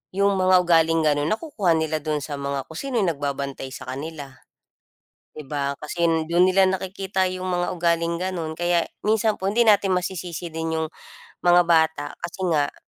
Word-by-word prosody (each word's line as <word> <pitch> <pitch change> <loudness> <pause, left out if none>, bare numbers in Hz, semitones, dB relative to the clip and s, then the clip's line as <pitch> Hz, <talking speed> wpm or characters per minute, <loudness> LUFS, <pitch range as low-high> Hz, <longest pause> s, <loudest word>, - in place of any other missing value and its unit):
yung 200 -1 +2
mga 185 0 +4
ugaling 165 -1 +3
ganun, 145 -1 +2
nakukuha 215 - 0
nila 160 -1 -1
dun 150 -1 -2
sa 145 +1 -5
mga 140 -1 -3
kung 160 +4 -9
sino 275 -2 -4
yung 190 -6 +2
nagbabantay 140 -2 -4
sa - - -8
kanila, 145 0 -7 1.0
di - - -8
ba? 140 -1 -2
Kasi 170 +3 -1 0.2
dun 175 +2 +4
nila 185 0 +4
nakikita 190 0 -2
yung 185 0 -4
mga 175 0 -1
ugaling 170 0 0
ganun. 175 -4 -3
Kaya 175 +1 +1 0.2
minsan 220 +1 +2
po 190 - -2
hindi 235 +4 +3
natin 200 -3 +4
masisisi 175 -2 -5
din 160 0 -2
yung 160 0 -1 0.6
mga 175 0 +7
bata, 160 -3 +3
kasi 170 +2 -7
nga 145 -3 +1
170 Hz, 170 wpm, -23 LUFS, 155-185 Hz, 1.0 s, mga